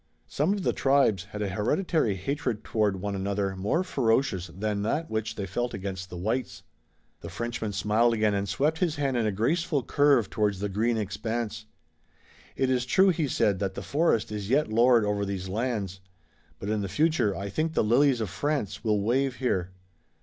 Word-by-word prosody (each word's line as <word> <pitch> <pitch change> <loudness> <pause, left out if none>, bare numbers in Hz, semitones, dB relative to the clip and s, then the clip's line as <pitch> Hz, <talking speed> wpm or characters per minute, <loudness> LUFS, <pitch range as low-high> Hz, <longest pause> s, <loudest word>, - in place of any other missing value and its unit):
Some 150 +6 0
of 200 -2 -3
the - - +1
tribes 135 -9 +2
had 105 +1 -5
a 100 - -2
hereditary 115 - 0
hatred 125 - -3
toward 105 -4 0
one 100 0 -2
another 100 0 -1
more 105 - 0
ferocious 115 - +1
than 100 +4 -3
that 150 +10 -1
which 110 0 -2
they 100 - -3
felt 120 +7 -2
against 95 -1 -5
the 90 - -7
whites. 110 +7 -3 0.6
The - - -8
Frenchman 115 -2 -3
smiled 110 +4 +2
again, 110 -1 +2
and 100 -1 -1
swept 150 - 0
his 170 -4 +1
hand 140 -3 -1
in 115 -2 +1
a - - +1
graceful 145 - 0
curve 140 -5 +3
toward 105 -3 0
the 100 +2 -3
green 110 +4 0
expanse. 110 +2 -3 0.9
"It 130 -1 +1
is 125 -1 0
true," 190 +8 +5
he 160 -4 +1
said, 100 -6 +1
"that 95 -1 -2
the 100 - -5
forest 140 - +1
is 105 -1 -4
yet 145 +2 +2
lord 120 -1 +5
over 105 0 0
these 95 -2 -3
lands, 105 -3 -2 0.6
but 100 - -7
in 105 0 0
the 100 - -3
future 150 - +1
I 100 +1 -4
think 155 +9 -2
the - - +3
lilies 125 +3 +3
of 105 -5 -3
France 105 -2 -2
will 105 -3 +1
wave 130 +4 +1
here. 95 -9 -1
110 Hz, 190 wpm, -27 LUFS, 100-135 Hz, 0.9 s, true